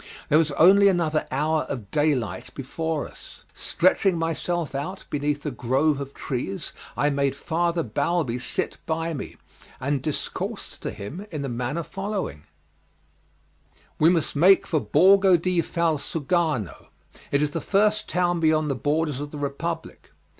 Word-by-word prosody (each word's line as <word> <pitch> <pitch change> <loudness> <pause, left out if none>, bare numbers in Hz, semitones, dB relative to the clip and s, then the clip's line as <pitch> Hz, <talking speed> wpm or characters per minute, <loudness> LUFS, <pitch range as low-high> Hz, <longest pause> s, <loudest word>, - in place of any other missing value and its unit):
There 150 - +5
was 160 -2 +2
only 195 +7 +7
another 165 -5 +1
hour 155 +3 +1
of 115 -8 -5
day 150 -1 +3
light 105 -7 -5
before 155 +3 -3
us. - - -14
Stretching 185 0 +2
myself 165 -1 -2
out 175 +8 -4
beneath 145 0 -1
a 150 - -1
grove 135 +5 +1
of 140 0 -7
trees 125 -8 -4 0.2
I 145 +1 +2
made 140 -1 0
Father 170 +3 0
Balbi 130 +2 -1
sit 125 - -3
by 165 +1 -1
me, 140 - -7 0.4
and 140 0 -1
discoursed 150 +1 -4
to - - -3
him 165 - -7
in 150 -6 -4
the 135 - -3
manner 125 +7 -2
following: 195 - -4 1.5
"We 155 - +6
must 170 -4 +1
make 185 +7 +6
for 160 - +1
Borgo 190 +3 +5
di 175 +1 +1
Valsugano, 160 - -1 0.4
it 140 +1 +2
is 150 - 0
the - - -3
first 210 +1 +2
town 175 -1 +1
beyond 155 -2 +2
the - - +1
borders 150 +2 0
of 145 0 -5
the 150 - -8
Republic. 155 +4 -4
155 Hz, 150 wpm, -25 LUFS, 140-170 Hz, 1.5 s, only